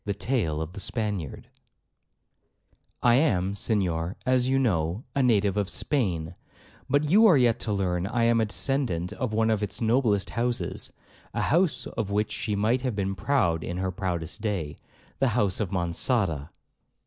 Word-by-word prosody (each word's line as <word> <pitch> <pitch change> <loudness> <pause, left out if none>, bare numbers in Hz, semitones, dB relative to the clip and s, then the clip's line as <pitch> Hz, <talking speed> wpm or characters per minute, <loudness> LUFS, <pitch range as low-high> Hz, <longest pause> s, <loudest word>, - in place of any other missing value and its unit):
Tale 85 - 0
of 80 +2 -9
the 100 - -7
Spaniard 100 - -3 1.6
'I 120 - +5
am, 100 - +2
Senhor, 95 -4 -1
as 130 -1 +2
you 135 +1 +2
know, 95 -5 0
a 140 - +2
native 105 -5 +2
of 100 -2 0
Spain, 90 - -1 0.6
but 145 +3 +3
you 220 +4 +7
are 175 -8 +6
yet 120 -3 +3
to 110 - -3
learn 90 -2 0
I 115 +3 0
am 115 0 +4
a - - +2
descendant 105 -7 -1
of 130 -5 -3
one 110 +1 +2
of 110 -2 0
its 105 - -2
noblest 110 -3 +1
houses,—a 120 +1 -2 0.5
house 170 +1 +2
of 110 -4 -4
which 105 +1 0
she 105 -1 -2
might 110 +5 +1
have 125 -4 -2
been 95 -1 -1
proud 95 - +1
in 90 - -4
her 95 0 -1
proudest 90 -2 -4
day,—the 100 - -4
house 105 -5 +1
of 105 -5 -1
Monçada. 85 - -1
105 Hz, 160 wpm, -26 LUFS, 90-125 Hz, 1.6 s, you